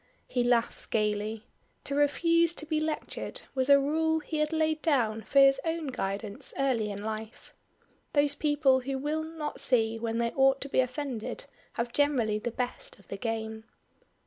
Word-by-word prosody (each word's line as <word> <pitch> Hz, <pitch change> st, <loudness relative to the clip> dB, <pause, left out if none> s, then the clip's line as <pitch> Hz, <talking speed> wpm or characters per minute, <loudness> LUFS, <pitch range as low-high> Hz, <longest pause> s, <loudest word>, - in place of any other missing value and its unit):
He 245 Hz, -, 0 dB
laughs 240 Hz, -1 st, +1 dB
gaily. 215 Hz, 0 st, -1 dB, 0.4 s
To 280 Hz, -, -4 dB
refuse 335 Hz, +4 st, +3 dB
to 305 Hz, -, -5 dB
be 310 Hz, -1 st, 0 dB
lectured 310 Hz, -1 st, -4 dB
was 260 Hz, 0 st, 0 dB
a 280 Hz, 0 st, +8 dB
rule 320 Hz, +3 st, +1 dB
he 315 Hz, 0 st, -4 dB
had 305 Hz, +1 st, +1 dB
laid 315 Hz, -1 st, +1 dB
down 235 Hz, -9 st, +1 dB
for 220 Hz, +6 st, -3 dB
his 275 Hz, 0 st, +7 dB
own 325 Hz, -3 st, -2 dB
guidance 205 Hz, -3 st, -3 dB
early 250 Hz, -6 st, +1 dB
in 200 Hz, 0 st, -6 dB
life. 220 Hz, +1 st, -6 dB, 0.6 s
Those 285 Hz, -1 st, +3 dB
people 290 Hz, -3 st, +3 dB
who 265 Hz, +1 st, -3 dB
will 300 Hz, +3 st, -1 dB
not 315 Hz, -1 st, -5 dB
see 225 Hz, -3 st, +2 dB
when 230 Hz, 0 st, -2 dB
they 235 Hz, 0 st, 0 dB
ought 270 Hz, 0 st, +3 dB
to 280 Hz, -, -4 dB
be -, -, +1 dB
offended 255 Hz, -2 st, -2 dB, 0.3 s
have 235 Hz, +1 st, -3 dB
generally 250 Hz, -8 st, +2 dB
the 240 Hz, -, -3 dB
best 245 Hz, +2 st, -4 dB
of 200 Hz, -, -22 dB
the 195 Hz, -, -5 dB
game. 220 Hz, 0 st, -4 dB
265 Hz, 170 wpm, -29 LUFS, 225-295 Hz, 0.6 s, a